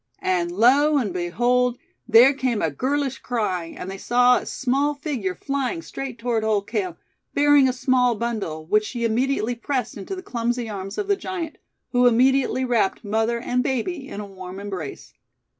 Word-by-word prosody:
And 175 -2 +1
lo 275 +10 +4
and 215 -9 -1
behold, 240 +8 +1 0.3
there 240 +4 +7
came 255 -5 -1
a 160 - 0
girlish 270 - -1
cry, 210 -8 -2
and 165 - -8
they 195 - -7
saw 245 +2 +4
a - - -6
small 275 +3 0
figure 265 - -3
flying 280 - -2
straight 270 -3 -6
toward 230 -1 -1
Old 210 -2 +1
Cale, 195 -6 -3 0.4
bearing 290 -2 +5
a - - +2
small 250 -1 +2
bundle, 210 -9 -3
which 215 +6 +2
she 235 +1 -3
immediately 245 +1 0
pressed 250 -1 -3
into 205 - -5
the 370 - -8
clumsy 240 - -2
arms 195 -2 -6
of 410 - -2
the 405 - +3
giant, 350 -5 -5 0.3
who 245 0 +4
immediately 260 +2 +3
wrapped 235 -5 +1
mother 225 +3 0
and 250 +1 0
baby 270 +4 -2
in 205 - -7
a 210 - -5
warm 190 -1 -9
embrace. 190 -8 -7
240 Hz, 175 wpm, -23 LUFS, 205-265 Hz, 0.4 s, there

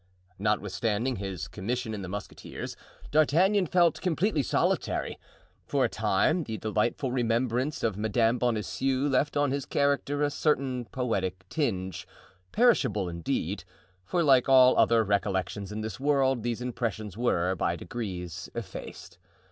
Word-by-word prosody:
Notwithstanding 105 +4 0
his 95 -5 -5
commission 115 +3 -3
in 105 - -4
the 90 - -6
musketeers, 100 +2 -7 0.4
D'Artagnan 175 +6 +3
felt 175 0 +3
completely 180 -1 +1
solitary. - - 0 0.5
For - - +2
a - - 0
time 155 - +1
the 110 -1 -4
delightful 110 +5 -1
remembrance 125 +3 0
of 110 -4 0
Madame 115 +3 +2
Bonancieux 125 +4 0
left 145 +2 +1
on 145 -2 +2
his 140 -1 -2
character 140 0 +1
a 145 - +1
certain 135 -5 0
poetic 95 -7 -2
tinge, 95 - -2 0.4
perishable 105 - +3
indeed; 85 -1 -3 0.4
for 175 - 0
like 135 -4 +4
all 130 -1 +7
other 115 -1 +4
recollections 100 -1 -1
in 105 +1 -4
this 110 -1 -5
world, 135 -3 +2
these 120 +1 -2
impressions 110 -5 -3
were, 95 -6 +1
by 85 -1 -1
degrees, 90 -4 -6
effaced. 115 -3 -8
120 Hz, 130 wpm, -28 LUFS, 100-140 Hz, 0.5 s, all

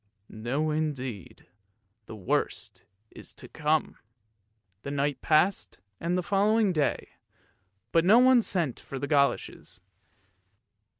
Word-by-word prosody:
No 130 +8 -2
indeed, 135 - -4 0.6
the 110 - -8
worst 95 -4 -3 0.3
is - - -9
to - - -11
come. 155 0 -1 0.8
The 140 - -6
night 145 0 -1
passed 165 +5 +1 0.2
and 175 +2 -1
the 180 - -1
following 205 +1 +2
day, 150 -4 -1 0.8
but 165 - +3
no 200 +6 +6
one 255 0 +6
sent 170 - -1
for 135 - -8
the 140 - -3
goloshes. 140 -1 0
155 Hz, 115 wpm, -27 LUFS, 140-185 Hz, 0.8 s, no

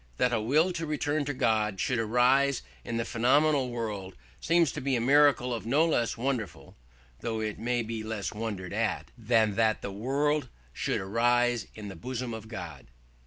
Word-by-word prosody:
"That 125 - +2
a 115 - +1
will 155 +11 +2
to 165 -2 -4
return 150 0 -1
to 145 - -2
God 110 -5 +1
should 125 +4 0
arise 125 +4 +3 0.2
in 115 - -3
the 115 - -1
phenomenal 135 +3 +2
world 105 -6 -4 0.2
seems 165 -4 +3
to - - -6
be 135 0 0
a - - +1
miracle 130 -2 +4
no 140 +8 +2
less 120 -9 0
wonderful 115 -9 -3 0.4
(though 115 -1 -3
it 110 0 -4
be 115 -2 -1
less 110 -2 -4
wondered 105 -4 -5
at) 110 -2 -1
than 115 -2 +2
that 110 -1 +2
the 100 - -4
world 140 +6 0 0.2
should - - -1
arise 120 +3 +1
in 105 -2 -7
the 95 - -8
bosom 125 -1 -4
of 110 -1 -7
God." 85 - -8
120 Hz, 170 wpm, -29 LUFS, 110-135 Hz, 0.4 s, miracle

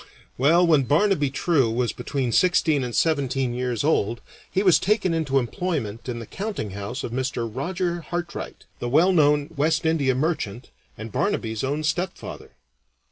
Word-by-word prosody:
Well, 165 +7 +4
when 155 -5 +4
Barnaby 150 0 +2
True 140 -3 +1
was 120 +1 0
between 130 -4 -2
sixteen 160 -3 +3
and 120 -2 -4
seventeen 135 -5 +1
years 125 -1 -2
old 120 -7 +1 0.3
he 190 - 0
was 185 -4 +5
taken 195 -3 +1
into 155 -4 0
employment 120 - -2
in 120 - -3
the 115 - -6
countinghouse 115 - -5
of - - -4
Mr. 125 -2 -2
Roger 170 - -2
Hartright, 175 0 -5
the 120 - -3
well 165 +8 +4
known 150 -2 +3
West 155 +3 +1
India 145 -5 +2
merchant, 130 - -2 0.3
and 110 0 -7
Barnaby's 110 - -1
own 145 +3 -1
stepfather. 175 +3 -3
145 Hz, 150 wpm, -24 LUFS, 120-170 Hz, 0.3 s, was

